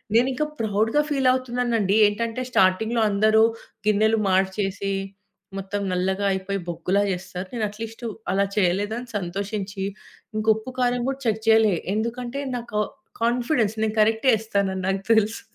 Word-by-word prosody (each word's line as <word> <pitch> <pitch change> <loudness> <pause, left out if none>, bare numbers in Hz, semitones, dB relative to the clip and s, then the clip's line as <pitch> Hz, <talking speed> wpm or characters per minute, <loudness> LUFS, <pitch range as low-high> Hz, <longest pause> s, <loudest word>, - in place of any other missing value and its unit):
నేను 240 +3 +5
ఇంకా 300 +4 -1
ప్రౌడ్‌గా 220 +7 +2
ఫీల్ 270 -2 +3
అవుతున్నాను 245 -2 -1
అండి. 200 0 +2
ఏంటంటే, 230 +4 -2
స్టార్టింగ్‌లో 220 +4 +3
అందరూ 215 +2 +4 0.4
గిన్నెలు 215 +1 +3
మార్చేసి, 195 +1 0 0.7
మొత్తం 195 +1 -4
నల్లగా 190 +2 0
అయిపోయి 190 +1 -3
బొగ్గులా 175 +4 0
చేస్తారు. 185 0 -5
నేను 230 -3 -1
అట్లీస్టు 225 +3 -7 0.2
అలా 195 +1 +2
చేయలేదు 200 +2 +1
అని 250 - -9
సంతోషించి 195 +2 -4 0.5
ఇంకా 215 - -2
ఉప్పు, 220 +4 -7
కారం 245 0 +1
కూడా 270 0 -3
చెక్ 220 0 0
చేయలే. 220 -3 +5 0.2
ఎందుకంటే 240 +4 -3 0.2
నాకు 235 -3 -4 0.4
కాన్ఫిడెన్స్. 235 -1 +1
నేను 220 -1 0
కరెక్టే 220 +4 +3
ఏస్తానని 200 -3 -1
నాకు 195 0 0
తెలుసు. 220 0 +2
215 Hz, 140 wpm, -24 LUFS, 195-230 Hz, 0.7 s, నేను